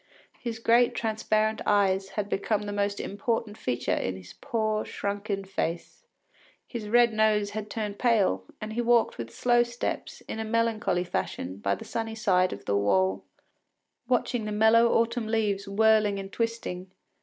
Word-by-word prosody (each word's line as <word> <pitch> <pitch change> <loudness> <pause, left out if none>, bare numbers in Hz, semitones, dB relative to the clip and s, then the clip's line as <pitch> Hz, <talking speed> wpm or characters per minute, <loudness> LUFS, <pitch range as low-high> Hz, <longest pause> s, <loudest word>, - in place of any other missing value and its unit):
His 235 -2 -4
great 240 +2 +3
transparent 220 -1 0
eyes 195 -1 +2
had 205 -1 0
become 205 +1 -1
the 205 - -4
most 200 0 -1
important 210 +1 -2
feature 125 - -1
in 95 - -1
his 90 -1 -11
poor 215 -2 0
shrunken 200 -1 -3
face; 190 - -4 0.6
his 225 -4 -6
red 240 0 +5
nose 215 -1 +2
had 215 0 -5
turned 210 -2 -4
pale, 205 - +2 0.2
and 215 0 -5
he 240 - 0
walked 235 - +2
with 115 -1 -5
slow 240 - +3
steps, 240 0 -4
in 220 - -6
a - - -1
melancholy 220 -4 0
fashion, 95 - -4
by 100 0 0
the - - -10
sunny 225 -1 -3
side 185 -5 +2
of 100 - -8
the 100 - 0
wall, 95 -1 +1 0.8
watching 245 -2 0
the 210 - -3
yellow 225 +2 +6
autumn 230 0 +1
leaves 210 -3 0
whirling 215 0 +3
and 195 0 -7
twisting. 230 -6 -3
215 Hz, 160 wpm, -27 LUFS, 195-230 Hz, 0.8 s, yellow